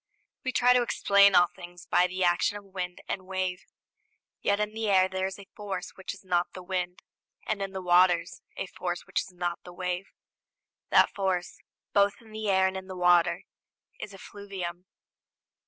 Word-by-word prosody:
We 255 - -1
try 250 0 +5
to 250 - +4
explain 200 -4 +4
all 175 - +8
things 175 -1 -11
by 180 - +3
the 185 +1 -2
action 175 +3 +2
of 205 - -11
wind 185 -2 -6
and 185 -1 -4
wave; 185 -1 -2 0.8
yet 200 0 +1
in 210 0 -1
the 220 -1 -2
air 190 -1 +5
there 190 0 -2
is 190 - -7
a 200 - -12
force 195 -3 -5
which 190 - -6
is 205 -1 -12
not 175 -1 0
the 185 - -8
wind, 180 -1 -3 0.4
and 210 -2 -2
in 195 -1 -3
the 190 -1 -5
waters 175 -1 +3 0.2
a - - -2
force 180 -1 -5
which - - 0
is - - -10
not 175 -1 -3
the 180 - -11
wave. 180 +1 -3 0.8
That - - +5
force, 190 -3 -2 0.3
both 200 0 +4
in 225 -2 -17
the 215 -1 -3
air 190 -1 +4
and 190 0 0
in 190 0 -6
the 185 -1 -7
water, 175 -1 +4 0.6
is 210 - -6
effluvium. 190 -3 -7
185 Hz, 190 wpm, -28 LUFS, 180-200 Hz, 0.8 s, all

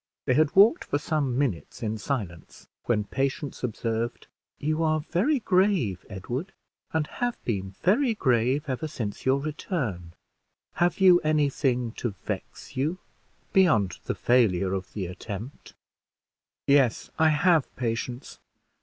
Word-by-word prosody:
They 130 - +3
had 155 +2 +2
walked 215 - +6
for - - 0
some 145 -4 -1
minutes 125 -7 -2
in 110 0 -2
silence, 100 - -5 0.2
when 110 -3 +1
Patience 135 +6 -3
observed, 115 0 -2 0.3
"You 155 +2 -1
are 155 -1 +2
very 230 - +1
grave, 185 - +1
Edward, 120 - -5 0.4
and 160 -1 0
have 245 +9 -3
been 95 -5 -2
very 225 - +3
grave 130 - +2
ever 135 +4 -2
since 115 -6 -5
your 135 +1 +4
return; 135 - -4 0.6
have 175 +2 +1
you 185 -2 +7
any 155 -3 +2
thing 125 -4 0
to 115 -5 -3
vex - - -6
you 150 +7 0 0.6
beyond 115 - +3
the - - -2
failure 100 -7 +2
of 95 -1 -4
the 100 -3 -3
attempt." 105 +7 -8 0.9
"Yes, 140 -4 +3
I 160 0 +5
have, 160 -1 +3
Patience. 120 +2 -4
135 Hz, 135 wpm, -26 LUFS, 110-160 Hz, 0.9 s, you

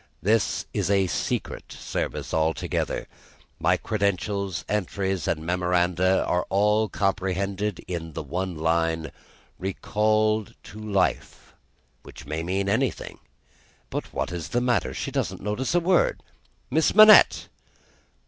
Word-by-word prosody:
This 110 +3 +1
is - - -1
a 100 -1 +3
secret 90 - -3
service - - -4
altogether. 80 0 -1 0.5
My - - +3
credentials, 100 -2 -2
entries, 95 -2 -2
and 80 -1 -1
memoranda, 90 +1 +1
are 90 0 0
all 105 +2 +2
comprehended 95 +1 -2
in 85 -3 -5
the 80 - -5
one 90 +4 -3
line, 80 0 0 0.5
'Recalled 110 +3 0
to 105 - -11
Life;' 100 -3 -2 0.5
which - - -12
may 75 +3 -3
mean 95 +4 -1
anything. 100 - -1 0.7
But - - -4
what - - -3
is 85 -3 -5
the 120 - 0
matter! 120 - 0
She - - -4
doesn't - - -2
notice 120 - -1
a - - +5
word! 175 +1 +2 0.5
Miss 160 +6 +2
Manette!" 215 0 +8
95 Hz, 120 wpm, -25 LUFS, 90-105 Hz, 0.7 s, Manette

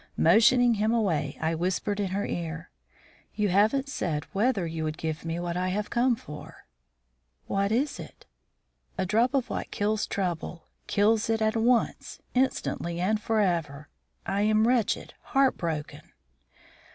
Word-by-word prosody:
Motioning 235 +7 +5
him 215 +2 +1
away, 175 -11 0
I 160 +1 0
whispered 185 +5 -1
in 200 - 0
her 195 +2 -2
ear: 165 0 -5 0.6
"You 210 -1 +1
haven't 215 +9 +3
said 160 - -2
whether 205 -2 +1
you 160 -1 -4
would 155 0 -3
give 160 -1 -4
me 165 +1 -3
what 175 0 -3
I 180 +1 0
have 210 +3 -2
come 245 +1 +3
for." 150 -8 -11 0.8
"What 200 +1 0
is 275 +6 0
that?" - - -11 0.7
"A 190 - 0
drop 230 +8 +2
of 260 -3 0
what - - -3
kills 210 +1 -1
trouble; 175 -3 -3 0.2
kills 215 +2 +2
it 225 0 +2
at 220 0 +1
once, 235 +1 +1
instantly, 210 -9 -1
and 210 +4 +1
forever. 170 -10 0 0.4
I 195 +1 0
am 215 +1 +3
wretched, 245 -4 0
heartbroken." 170 - 0
205 Hz, 145 wpm, -27 LUFS, 170-225 Hz, 0.8 s, Motioning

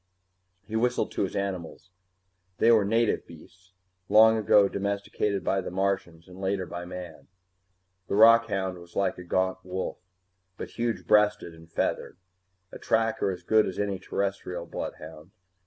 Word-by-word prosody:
He 110 - -6
whistled 120 +2 0
to - - -3
his 95 - -2
animals. 95 -2 -5 0.7
They 115 - +5
were 110 -3 +5
native 115 +2 +1
beasts, 90 +3 -16 0.4
long 110 +2 +7
ago 105 -2 +4
domesticated 100 0 -2
by 95 0 0
the - - -6
Martians 90 -3 -2
and 90 +1 -12
later 95 -1 -1
by 90 0 -7
man. 90 -3 -9 0.8
The - - -1
rockhound 105 -4 +4
was 85 0 -16
like 100 -2 0
a - - -8
gaunt 95 +1 0
wolf, 95 +1 -4 0.6
but - - -7
huge 115 -1 -3
breasted 105 -5 +3
and 80 0 -16
feathered, - - -2 0.5
a - - -10
tracker 115 -2 +1
as 90 -2 -5
good 110 +3 +3
as 95 - -5
any 100 -2 -2
Terrestrial 95 -2 -3
bloodhound. 80 0 -8
95 Hz, 150 wpm, -27 LUFS, 90-105 Hz, 0.8 s, long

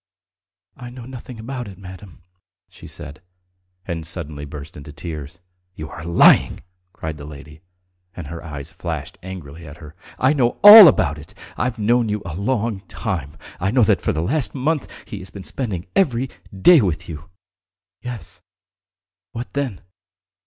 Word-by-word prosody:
"I 125 - -9
know 120 -1 -10
nothing 125 -1 -9
about 120 +1 -5
it, 95 -3 -11
madam," 90 -2 -12 0.4
she - - -14
said, 75 +3 -9 0.6
and 85 -3 -4
suddenly 80 -3 -4
burst 75 +2 -9
into 75 0 -10
tears. 75 +1 -7 0.4
"You 80 0 -7
are 80 - -8
lying!" 85 +1 +4 0.3
cried 80 -3 -6
the 70 - -9
lady, 75 +1 -12 0.5
and 90 - -7
her 85 +3 -8
eyes 70 -3 -8
flashed - - -6
angrily 85 -4 -9
at 75 +1 -11
her. 75 -1 -13 0.2
"I 130 +3 +3
know 125 -5 +1
all 205 -1 +13
about 75 - +2
it! 75 - -14 0.2
I've 120 -1 -2
known 115 +2 +2
you 105 -1 -2
a 85 - -5
long 110 +2 -1
time. 80 -3 -4 0.2
I 95 - 0
know 125 +3 +4
that - - +3
for - - 0
the 80 - -2
last 140 - -1
month 145 +3 -1 0.2
he 105 - -7
has 95 0 -9
been 100 - -10
spending 100 -9 -4
every 130 -9 +1 0.2
day 145 - +6
with 90 -6 -2
you!" 80 +2 -9 0.7
"Yes. 120 -3 -8 0.9
What 120 +1 -6
then? 135 -9 -3
95 Hz, 160 wpm, -21 LUFS, 80-120 Hz, 0.9 s, all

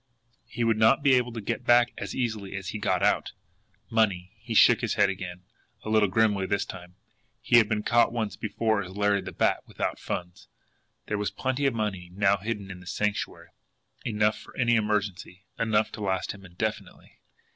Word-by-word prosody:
He 120 - -3
would 115 -1 +2
not 110 +6 +4
be 140 -2 +5
able 125 -1 +2
to 115 -1 -6
get - - -3
back 120 0 +5
as - - -6
easily 110 -6 -3
as 95 -2 -5
he 110 - -4
got - - 0
out! - - +1 0.6
Money! 100 -5 +1
He 115 +1 -6
shook - - +6
his - - -1
head 100 - +4
again 90 -1 -7 0.4
a - - -5
little 110 -2 +3
grimly 100 -2 +2
this 100 +1 0
time. 90 -1 -10 0.4
He 120 - +4
had 110 -3 +5
been 105 -1 -1
caught 120 +1 +3
once 115 -3 -2
before 110 0 -1
as 95 0 -9
Larry 105 -1 +2
the - - -7
Bat - - +1
without - - -3
funds! 90 0 -6 0.6
There 105 - -2
was 105 - -1
plenty 130 +2 -1
of 130 - 0
money 95 -5 -3
now 100 0 +3
hidden 100 -1 -5
in 90 - -9
the 90 - -14
Sanctuary, 105 +2 -3 0.5
enough 105 -2 +1
for - - -15
any 120 -2 +3
emergency, 105 -4 -2 0.2
enough 110 -1 +1
to - - -8
last 95 -2 -1
him 100 -1 -11
indefinitely. 95 +5 -5
105 Hz, 190 wpm, -27 LUFS, 95-115 Hz, 0.6 s, shook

